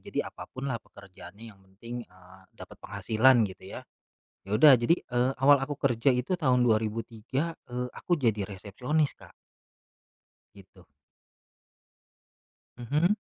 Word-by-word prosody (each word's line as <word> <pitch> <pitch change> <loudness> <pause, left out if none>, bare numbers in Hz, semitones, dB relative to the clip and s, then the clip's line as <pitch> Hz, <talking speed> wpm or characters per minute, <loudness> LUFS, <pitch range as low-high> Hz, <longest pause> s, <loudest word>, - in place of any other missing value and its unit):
Jadi - - -5
apa - - -10
pun 130 +1 -8
lah 115 - -4
pekerjaannya 100 +2 -14
yang 95 - -24
penting, 115 +6 -9
eee, 95 0 -19 0.2
dapat - - -12
penghasilan 110 +4 +3
gitu 95 -2 -8
ya. - - -6 0.7
Ya - - -10
udah 145 +7 +8
jadi, 120 +8 +3
eee, 125 +2 0
awal 145 +1 +7
aku 135 +2 -3
kerja 130 -1 +1
itu 130 +9 -1
tahun 125 -4 +2
2003, 115 +7 -1
eee, 125 0 -4
aku 175 - -1
jadi 110 - 0
resepsionis 125 - -2
Kak. - - -16 1.2
Gitu. 95 -2 -18 1.9
Mhm. 150 - +1
120 Hz, 130 wpm, -28 LUFS, 100-135 Hz, 1.9 s, udah